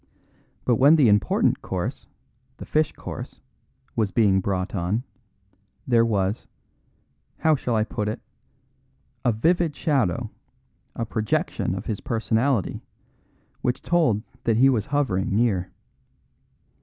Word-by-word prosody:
But 120 Hz, -3 st, +3 dB
when 140 Hz, +4 st, +7 dB
the 145 Hz, -6 st, +5 dB
important 105 Hz, -1 st, +2 dB
course, -, -, -4 dB, 0.5 s
the -, -, -8 dB
fish 155 Hz, 0 st, +1 dB
course, -, -, -8 dB, 0.6 s
was 110 Hz, -3 st, +1 dB
being 95 Hz, -1 st, +3 dB
brought 95 Hz, -1 st, -2 dB
on, 100 Hz, +5 st, -1 dB, 0.8 s
there 120 Hz, -2 st, +4 dB
was 105 Hz, -2 st, 0 dB, 0.9 s
how 160 Hz, -, +3 dB
shall 125 Hz, -4 st, -2 dB
I 110 Hz, -, +3 dB
put 105 Hz, -1 st, -3 dB
it? 105 Hz, -, -3 dB, 1.0 s
a 120 Hz, -, +3 dB
vivid 165 Hz, +7 st, +1 dB
shadow, 130 Hz, -, 0 dB, 0.6 s
a 115 Hz, -, -2 dB
projection 110 Hz, -1 st, -1 dB
of -, -, -6 dB
his 105 Hz, -, -3 dB
personality, 115 Hz, 0 st, 0 dB, 0.8 s
which 125 Hz, -, -1 dB
told 155 Hz, -12 st, +2 dB, 0.2 s
that 115 Hz, -2 st, +2 dB
he 135 Hz, +3 st, +6 dB
was 115 Hz, -6 st, 0 dB
hovering 125 Hz, -10 st, 0 dB
near. 105 Hz, -5 st, +1 dB
115 Hz, 120 wpm, -24 LUFS, 105-135 Hz, 1.0 s, when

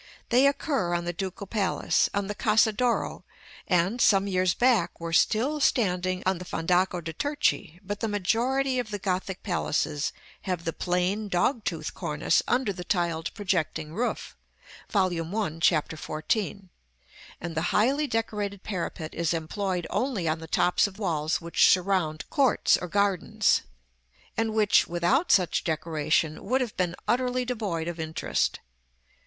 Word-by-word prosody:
They 255 Hz, +3 st, +5 dB
occur 275 Hz, -, 0 dB
on 175 Hz, 0 st, -2 dB
the 175 Hz, -, -2 dB
Ducal 190 Hz, +2 st, -5 dB
Palace, 200 Hz, -2 st, +1 dB
on 200 Hz, 0 st, -1 dB
the 205 Hz, -, -3 dB
Casa 220 Hz, 0 st, +3 dB
d' 210 Hz, -, -5 dB
Oro, 245 Hz, -2 st, 0 dB, 0.4 s
and, 180 Hz, +7 st, +1 dB
some 195 Hz, -1 st, +5 dB
years 185 Hz, -2 st, +1 dB
back, 235 Hz, -9 st, +2 dB
were 165 Hz, 0 st, -5 dB
still 250 Hz, -, +2 dB
standing 185 Hz, -8 st, +1 dB
on 190 Hz, -2 st, +1 dB
the -, -, -6 dB
Fondaco 180 Hz, +1 st, 0 dB
de' 165 Hz, 0 st, -6 dB
Turchi; 285 Hz, -, -1 dB
but 205 Hz, +1 st, -4 dB
the 225 Hz, -, -1 dB
majority 250 Hz, +6 st, +1 dB
of 240 Hz, -3 st, -3 dB
the 205 Hz, -, -3 dB
Gothic 190 Hz, -1 st, -3 dB
Palaces 160 Hz, -5 st, -1 dB, 0.4 s
have 180 Hz, -2 st, -1 dB
the 165 Hz, -, -2 dB
plain 180 Hz, +4 st, -1 dB
dog 205 Hz, +5 st, +1 dB
tooth 160 Hz, -4 st, -3 dB
cornice 150 Hz, -2 st, +1 dB
under 245 Hz, -5 st, +1 dB
the 180 Hz, -1 st, -7 dB
tiled 170 Hz, -3 st, -1 dB
projecting 160 Hz, -6 st, -2 dB
roof 240 Hz, +7 st, -3 dB, 0.5 s
(Vol. 190 Hz, -3 st, +2 dB
I. 170 Hz, 0 st, -3 dB
Chap. 165 Hz, -2 st, +3 dB
XIV. 160 Hz, -, -8 dB
§ 155 Hz, +9 st, -1 dB
IV.); 200 Hz, -, -16 dB, 0.8 s
and 170 Hz, 0 st, -5 dB
the 160 Hz, -, 0 dB
highly 275 Hz, +7 st, +2 dB
decorated 210 Hz, -4 st, -2 dB
parapet 170 Hz, -5 st, -4 dB
is 170 Hz, 0 st, 0 dB
employed 180 Hz, +2 st, -2 dB
only 240 Hz, -10 st, -1 dB
on 160 Hz, 0 st, 0 dB
the 160 Hz, -, -9 dB
tops 180 Hz, +5 st, +2 dB
of 195 Hz, -1 st, -12 dB
walls 160 Hz, -6 st, 0 dB
which 170 Hz, 0 st, +4 dB
surround 180 Hz, -4 st, +1 dB
courts 270 Hz, -5 st, +3 dB
or 180 Hz, -, -4 dB
gardens, 200 Hz, -1 st, +2 dB, 0.7 s
and 225 Hz, -1 st, -1 dB
which, 210 Hz, -2 st, +4 dB
without 175 Hz, -, +1 dB
such 180 Hz, -4 st, +3 dB
decoration, 155 Hz, -1 st, 0 dB
would 260 Hz, +2 st, +1 dB
have 240 Hz, -4 st, -3 dB
been 180 Hz, -1 st, -1 dB
utterly 250 Hz, 0 st, +1 dB
devoid 205 Hz, -10 st, -3 dB
of 170 Hz, -1 st, -5 dB
interest. 160 Hz, 0 st, -1 dB
185 Hz, 160 wpm, -27 LUFS, 170-220 Hz, 0.8 s, They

